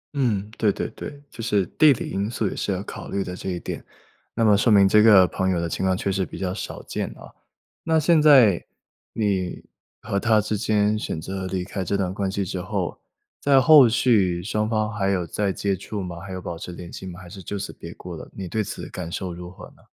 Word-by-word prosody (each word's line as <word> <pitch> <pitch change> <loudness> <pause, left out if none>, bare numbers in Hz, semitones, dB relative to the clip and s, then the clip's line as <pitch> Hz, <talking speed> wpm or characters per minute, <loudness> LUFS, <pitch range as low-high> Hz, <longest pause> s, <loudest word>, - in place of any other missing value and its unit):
嗯， 110 -7 0
对 105 -2 +3
对 - - -3
对， 145 - -9
就 115 - -9
是 105 -5 +1
地 150 - +5
理 130 - -2
因 100 +2 -1
素 110 -3 -1
也 - - -4
是 100 - -2
要 95 +1 -2
考 - - -8
虑 100 -1 -1
的 90 -1 -6
这 95 - -5
一 90 -1 -3
点。 - - -6 0.5
那 115 - +2
么 105 -1 +6
说 110 +3 +3
明 100 -1 +7
这 105 +2 +5
个 100 -4 +7
朋 95 +1 -1
友 90 -2 +1
的 85 - -1
情 85 - -3
况 95 -1 +2
确 100 - -1
实 95 0 0
比 - - -7
较 90 -1 -2
少 105 - -6
见 - - -3
啊， - - -13 0.5
那 160 -1 +2
现 155 0 +4
在 125 - +6 0.5
你 95 -5 -1 0.4
和 100 - -1
她 110 +1 +3
之 105 +1 -1
间 105 0 +1
选 80 - -4
择 95 +3 -5
离 95 -1 -2
开 95 0 -4
这 100 +2 -1
段 95 -2 -1
关 95 -1 -2
系 100 0 -2
之 90 0 -4
后， 95 -1 -3 0.4
在 140 -1 +5
后 140 -3 +8
续 100 -7 +2
双 105 +2 -1
方 110 -1 0
还 100 -1 0
有 90 -3 0
再 100 +4 -1
接 100 +1 -1
触 100 +2 -5
吗？ 90 -2 -6
还 95 +1 -9
有 95 - -4
保 85 -2 -6
持 90 - -7
联 85 0 -9
系 95 - -7
吗？ 90 -1 -8
还 95 - -12
是 95 +2 -10
就 100 +4 -5
此 100 - -5
别 85 - -10
过 90 -1 -8
了， - - -10
你 95 -2 -6
对 110 +4 -1
此 - - -6
感 85 -2 -6
受 95 -1 -4
如 90 +1 -8
何 90 - -11
呢？ - - -24
100 Hz, 265 characters per minute, -24 LUFS, 90-110 Hz, 0.5 s, 后